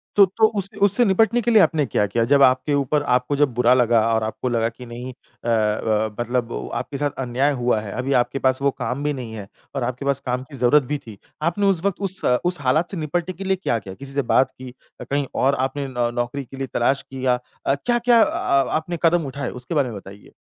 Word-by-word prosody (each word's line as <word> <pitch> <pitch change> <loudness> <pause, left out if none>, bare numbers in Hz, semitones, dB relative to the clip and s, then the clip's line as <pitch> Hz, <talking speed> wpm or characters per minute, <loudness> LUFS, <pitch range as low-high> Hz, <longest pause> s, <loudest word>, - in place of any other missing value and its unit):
तो 200 - +8
तो 210 +4 +2
उस 195 -1 +1
उससे 205 +5 +4
निपटने 225 +4 +3
के 240 - 0
लिए 220 -3 +7
आपने 155 -6 +2
क्या 105 -2 0
किया? 115 +4 0
जब 140 +2 +4
आपके 130 +3 +3
ऊपर 145 +1 +1
आपको 125 +1 +1
जब 145 -3 +2
बुरा 125 +1 +4
लगा 120 -2 +3
और 110 -1 +1
आपको 110 +3 -3
लगा 115 -1 +1
कि 125 +2 -12
नहीं 120 +2 -7
अ - - -32 0.3
अ, 110 -1 0
मतलब 120 -1 -1
उ - - -5
आपके 130 +4 -4
साथ 145 +1 0
अन्याय 130 +4 +1
हुआ 120 -4 +1
है। 105 - -7
अभी 130 +2 -1
आपके 135 +3 -4
पास 130 0 +1
वो 140 - +2
काम 125 +3 -4
भी 150 0 0
नहीं 125 -5 -7
है 105 -3 -7 0.3
और 135 - -1
आपके 125 +3 -4
पास 140 -1 +1
काम 125 0 -2
की 140 +1 -12
ज़रूरत 125 +4 +4
भी 145 +4 -3
थी। 105 -3 -10 0.2
आपने 175 +5 0
उस 185 -3 +2
वक़्त 200 0 -1
उस 190 +1 -2 0.2
उस 175 -1 0
हालात 155 +8 +1
से 195 - -5
निपटने 170 +3 -2
के 195 - -6
लिए 190 0 +1
क्या 115 - +1
किया? 95 -1 -9
किसी 140 +3 -8
से 140 - +1
बात 135 - +4
की 130 -1 -11 0.3
अ, - - -4
कहीं 140 0 -1 0.2
और 140 +1 +3
आपने 140 0 -5
नौ 120 -2 -1
नौकरी 120 +3 -3
के 135 - -12
लिए 135 0 -3
तलाश 135 +3 +1
किया 130 -2 0 0.3
अ, 135 - +2
क्या-क्या 240 - +3
अ, - - +2
आ 140 0 +2 0.2
आपने 170 +2 -4
कदम 165 -1 +3
उठाए? 140 0 -4
उसके 125 +6 -6
बारे 140 -4 +2
में 110 - -7
बताइए। 100 +1 -13
135 Hz, 245 wpm, -22 LUFS, 120-150 Hz, 0.3 s, तो